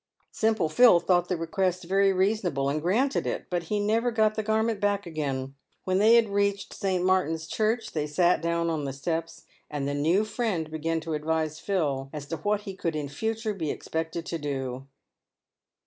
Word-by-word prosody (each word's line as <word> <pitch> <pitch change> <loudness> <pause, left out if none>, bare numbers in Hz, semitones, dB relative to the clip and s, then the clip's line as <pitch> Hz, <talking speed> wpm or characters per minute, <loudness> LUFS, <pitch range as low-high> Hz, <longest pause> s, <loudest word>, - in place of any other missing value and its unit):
Simple 220 -6 +1
Phil 180 +3 +6
thought 175 0 +2
the 180 - 0
request 180 +2 -1
very 195 +3 +3
reasonable, 185 -8 +1
and 150 +2 -1
granted 235 - +1
it, - - -3
but 175 -1 -1
he 210 +5 -1
never 225 +4 +1
got 220 -2 +2
the 215 - -2
garment 220 0 0
back 205 -1 0
again. 135 -5 -3 0.3
When 185 0 +1
they 220 +3 +6
had 230 -1 +5
reached 200 0 0
St. 185 -3 -1
Martin's 165 -4 +1
Church 220 +5 -1
they 150 -2 -2
sat 175 +4 +2
down 170 0 0
on 155 -3 -2
the 135 - -3
steps, 165 +4 -4 0.3
and 145 -2 -3
the 145 - -1
new 165 +9 +2
friend 205 -9 -2
began 160 +1 -1
to 160 0 -4
advise 155 0 -1
Phil 150 -8 -1
as 150 -2 -6
to 165 - -2
what 205 +6 0
he 195 -2 -7
would 165 -3 0
in 145 -2 -3
future 220 +7 -2
be 165 -6 -3
expected 160 +2 -3
to 165 - -4
do. 135 -2 -4
175 Hz, 190 wpm, -27 LUFS, 155-205 Hz, 0.3 s, Phil